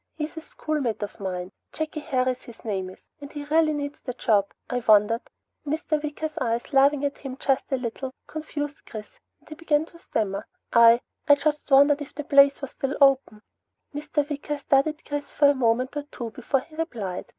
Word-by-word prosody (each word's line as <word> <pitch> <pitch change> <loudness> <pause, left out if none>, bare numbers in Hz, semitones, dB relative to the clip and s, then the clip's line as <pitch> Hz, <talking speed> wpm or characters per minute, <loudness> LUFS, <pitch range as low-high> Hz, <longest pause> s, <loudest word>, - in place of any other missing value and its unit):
"He's 310 +1 -4
a 320 - -6
schoolmate 275 -10 -3
of 205 - -7
mine. 185 -1 -4 0.2
Jakey 310 0 -4
Harris, 255 -3 0
his 235 -1 -14
name 190 -4 -2
is, 185 - -15 0.2
and 285 -1 -9
he 295 -1 -6
really 310 +1 +3
needs 290 0 -4
the 250 -2 -6
job. 200 -3 +2 0.2
I 250 - -1
wondered 215 +2 +5 0.3
" - - -56
Mr. 305 +1 -1
Wicker's 305 +1 -4
eyes, 235 +1 -1
laughing 280 +1 +4
at 280 - -3
him 270 -2 -7
just 270 0 0
a - - +3
little, 255 +1 -4
confused 295 -1 -5
Chris 215 -2 -9 0.2
and - - -27
he - - -6
began 310 -1 +1
to 335 +1 -17
stammer. 205 - -2 0.3
"I 235 0 +7 0.3
I 285 - +8
just 300 +1 -1
wondered 285 +1 +6
if 290 - -8
the 295 - -4
place 280 -1 +5
was 275 - -5
still 275 -1 -3
open." 270 -6 +3 0.5
Mr. 295 0 -1
Wicker 295 0 -3
studied 285 +2 +1
Chris 290 0 -4
for 285 -1 +4
a - - +1
moment 255 +1 +1
or 295 - -1
two 245 -5 -7
before 255 +3 -1
he 310 - -19
replied. 225 - -4
280 Hz, 195 wpm, -25 LUFS, 235-295 Hz, 0.5 s, I